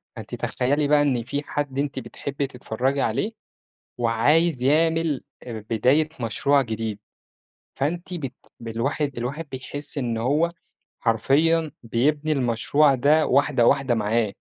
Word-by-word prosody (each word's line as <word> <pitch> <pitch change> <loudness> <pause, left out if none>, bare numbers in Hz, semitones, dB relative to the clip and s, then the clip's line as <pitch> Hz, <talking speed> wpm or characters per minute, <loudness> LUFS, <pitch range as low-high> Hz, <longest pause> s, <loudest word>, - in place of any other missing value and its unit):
فأنتِ - - -7
تخيّلي 145 +4 0
بقى 145 0 +4
إن 130 -5 +1
في 140 +4 -3
حد 145 -2 -3
أنتِ 145 +1 -2
بتحبي 140 0 -4
تتفرجي 130 +2 -2
عليه، 160 - 0 0.7
وعايز 125 +6 +2
يعمل 160 +1 +2 0.2
بداية 120 +7 +1
مشروع 140 +5 +2
جديد، 110 -3 -4 0.8
فأنتِ 170 +6 -2
بت 135 -7 -5 0.3
بالواحد 125 +4 -2
الواحد 140 +7 -4
بيحس 145 +3 -6
إن 120 -4 -1
هو 150 +8 +1 0.5
حرفيًا 150 +8 +2
بيبني 145 +7 +1
المشروع 135 +2 +3
ده 150 +4 +3
واحدة 135 -3 +3
واحدة 135 -3 +3
معاه، 110 -1 0
140 Hz, 120 wpm, -24 LUFS, 120-150 Hz, 0.8 s, بقى